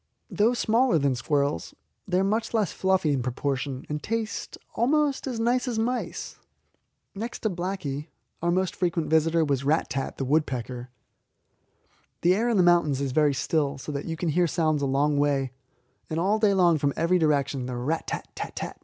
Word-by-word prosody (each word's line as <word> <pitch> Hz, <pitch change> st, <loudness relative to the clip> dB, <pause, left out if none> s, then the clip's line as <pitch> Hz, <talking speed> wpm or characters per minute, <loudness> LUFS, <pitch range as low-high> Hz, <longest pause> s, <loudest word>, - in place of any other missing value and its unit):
Though 225 Hz, +4 st, +2 dB
smaller 235 Hz, -3 st, +3 dB
than 140 Hz, -3 st, +2 dB
squirrels, 140 Hz, -, -1 dB, 0.3 s
they 180 Hz, -, +1 dB
are -, -, +2 dB
much 220 Hz, +4 st, 0 dB
less 210 Hz, -7 st, +1 dB
fluffy 190 Hz, -5 st, +1 dB
in 135 Hz, -, 0 dB
proportion, 130 Hz, +1 st, -3 dB
and 150 Hz, 0 st, -3 dB
taste 225 Hz, +3 st, -3 dB, 0.2 s
almost 285 Hz, +3 st, +1 dB
as 245 Hz, -4 st, -3 dB
nice 245 Hz, +3 st, +1 dB
as 240 Hz, -3 st, -2 dB
mice. 240 Hz, +3 st, -3 dB, 0.7 s
Next 225 Hz, +4 st, -5 dB
to 220 Hz, -, 0 dB
Blacky, 175 Hz, -5 st, -4 dB, 0.3 s
our 170 Hz, -, +1 dB
most 185 Hz, 0 st, 0 dB
frequent 170 Hz, -3 st, -1 dB
visitor 160 Hz, +1 st, +3 dB
was 140 Hz, -2 st, 0 dB
Rat 155 Hz, +4 st, +1 dB
tat, 135 Hz, -1 st, -3 dB
the 135 Hz, -, -2 dB
woodpecker. 125 Hz, -4 st, -1 dB, 1.3 s
The 175 Hz, +1 st, +4 dB
air 225 Hz, +5 st, +1 dB
in 230 Hz, -, +2 dB
the 185 Hz, -, +5 dB
mountains 170 Hz, -6 st, +4 dB
is 140 Hz, -2 st, -1 dB
very 145 Hz, 0 st, +3 dB
still, 145 Hz, 0 st, 0 dB
so 135 Hz, -, -6 dB
that 140 Hz, -1 st, -4 dB
you 165 Hz, -1 st, -4 dB
can 170 Hz, 0 st, -1 dB
hear 175 Hz, +3 st, +2 dB
sounds 155 Hz, -2 st, +1 dB
a 140 Hz, -, +1 dB
long 145 Hz, +2 st, +2 dB
way, 140 Hz, -3 st, +1 dB, 0.6 s
and 160 Hz, -, -1 dB
all 200 Hz, +5 st, +2 dB
day 210 Hz, -2 st, +3 dB
long 175 Hz, -4 st, +4 dB
from 140 Hz, -1 st, +1 dB
every 175 Hz, +3 st, +2 dB
direction 140 Hz, -4 st, +1 dB
the 125 Hz, -1 st, -4 dB
'rat 150 Hz, +7 st, -2 dB
tat -, -, -4 dB
tat -, -, -6 dB
tat!' -, -, -5 dB
160 Hz, 190 wpm, -26 LUFS, 140-195 Hz, 1.3 s, the